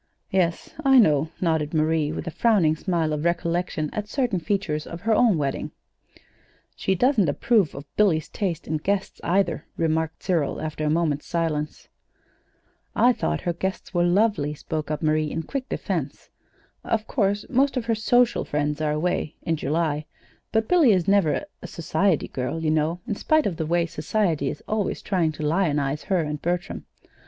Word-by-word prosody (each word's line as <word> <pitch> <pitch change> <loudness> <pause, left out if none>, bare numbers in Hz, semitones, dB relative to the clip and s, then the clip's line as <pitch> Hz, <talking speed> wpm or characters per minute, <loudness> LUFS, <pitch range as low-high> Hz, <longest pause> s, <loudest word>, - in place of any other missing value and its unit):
"Yes, 175 -3 0
I 270 -1 +6
know," 155 - +4
nodded 160 -3 0
Marie, 155 -1 +1
with - - -5
a 170 - -4
frowning 185 -7 +3
smile 165 -2 -1
of 150 0 -2
recollection 170 -2 -1
at 210 -1 -3
certain 240 -5 0
features 170 -5 -2
of 170 +1 -7
her 225 0 +2
own 220 -5 +4
wedding. 140 -2 -2 1.1
"She 190 - 0
doesn't 215 - +3
approve 200 +2 +2
of 140 +1 -7
Billy's 175 -7 +3
taste 175 -6 -3
in 155 - 0
guests, 195 +5 -2
either," 175 -1 +1
remarked 160 -1 -1
Cyril, 165 -7 0
after 155 0 -4
a 150 - +1
moment's 155 -2 0
silence. 155 -3 -2 1.1
"I 250 +1 +5
thought 75 - -2
her 175 - -1
guests 190 +4 -4
were 175 - +2
lovely," 175 -5 +2
spoke 155 0 -4
up 155 +1 -3
Marie, 155 0 +2
in 165 - -3
quick 275 - -5
defense. - - -4 0.5
"Of 220 -1 -1
course, 205 -4 0
most 270 +1 +2
of 240 - -1
her 230 - +1
social 240 +2 +2
friends 150 +1 -2
are 155 - +1
away 160 0 -1
in 165 - 0
July; 155 -1 -1 0.4
but 220 0 +1
Billy 320 -11 +5
is 180 -3 +1
never 195 -6 +2 0.2
a - - -7
society 170 +1 0
girl, 130 +5 -3
you 155 - +2
know, 160 +3 0
in - - -2
spite 310 +8 +2
of 175 -5 -1
the 160 - -2
way 170 +1 +2
Society 160 -2 -1
is - - -7
always 215 -2 -1
trying 175 -5 +1
to 155 - -6
lionize 150 -4 0
her 185 -3 +1
and 150 -1 -4
Bertram." 175 +2 -3
170 Hz, 175 wpm, -24 LUFS, 155-200 Hz, 1.1 s, I